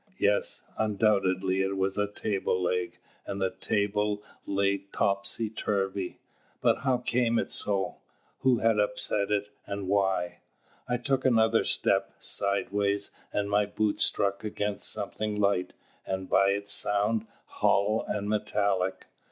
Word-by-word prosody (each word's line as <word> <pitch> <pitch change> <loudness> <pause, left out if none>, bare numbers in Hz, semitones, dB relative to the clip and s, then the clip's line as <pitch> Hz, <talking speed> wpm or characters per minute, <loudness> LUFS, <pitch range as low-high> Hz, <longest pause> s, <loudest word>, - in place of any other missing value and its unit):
Yes, 100 0 +1 0.2
undoubtedly 95 -3 +2
it 95 0 -1
was 95 0 0
a 105 0 +1
table 100 -2 -1
leg 90 0 -1 0.3
and 100 - -4
the 95 -1 0
table 105 0 -1 0.2
lay 100 0 +1
topsy 100 +2 0
turvy. 95 -3 -2 0.4
But - - +2
how 130 -2 +1
came 120 -1 +1
it - - -1
so? 100 -2 -1 0.4
Who 130 -2 +3
had 115 -1 +2
upset 105 0 +1
it, 105 -1 0 0.2
and 100 -1 -4
why? 95 -3 0 0.5
I 125 0 0
took 130 +2 0
another 115 -3 +4
step, - - +1
sideways, 100 0 +1 0.2
and 100 -1 -1
my 105 0 +2
boot 105 0 -1
struck 100 0 +1
against 105 -1 +1
something 105 0 -3
light, 100 -3 +1 0.3
and, 95 0 -4
by 95 - +4
its 100 +1 0
sound, 105 +2 +1 0.2
hollow 105 +3 +1
and 105 -1 -2
metallic. 100 -3 0
100 Hz, 135 wpm, -28 LUFS, 100-105 Hz, 0.5 s, another